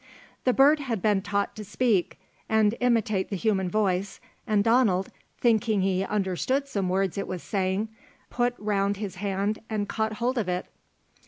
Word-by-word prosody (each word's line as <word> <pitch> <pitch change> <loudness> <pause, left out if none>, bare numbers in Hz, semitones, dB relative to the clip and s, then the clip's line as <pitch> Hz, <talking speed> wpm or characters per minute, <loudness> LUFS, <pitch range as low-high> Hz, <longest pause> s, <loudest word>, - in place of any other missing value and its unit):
The 255 - +5
bird 285 +4 +5
had 250 -7 -2
been 205 0 +2
taught 200 +1 -1
to 215 - -6
speak, 210 -2 0 0.3
and 220 -1 +3
imitate 225 -6 +1
the 200 - -2
human 190 -2 0
voice, 195 -1 0 0.3
and 210 -2 +3
Donald, 220 -5 +3 0.3
thinking 220 -3 +2
he 190 0 +1
understood 210 +8 -1
some 200 -8 -2
words 190 0 0
it - - -3
was 185 -2 -5
saying, 195 +1 -1 0.4
put 245 0 0
round 200 -1 0
his 195 -3 -5
hand 200 +2 -1
and 210 -2 -1
caught 220 +1 -1
hold 240 +3 -1
of 200 -5 -2
it. 180 0 -1
205 Hz, 165 wpm, -26 LUFS, 190-225 Hz, 0.4 s, The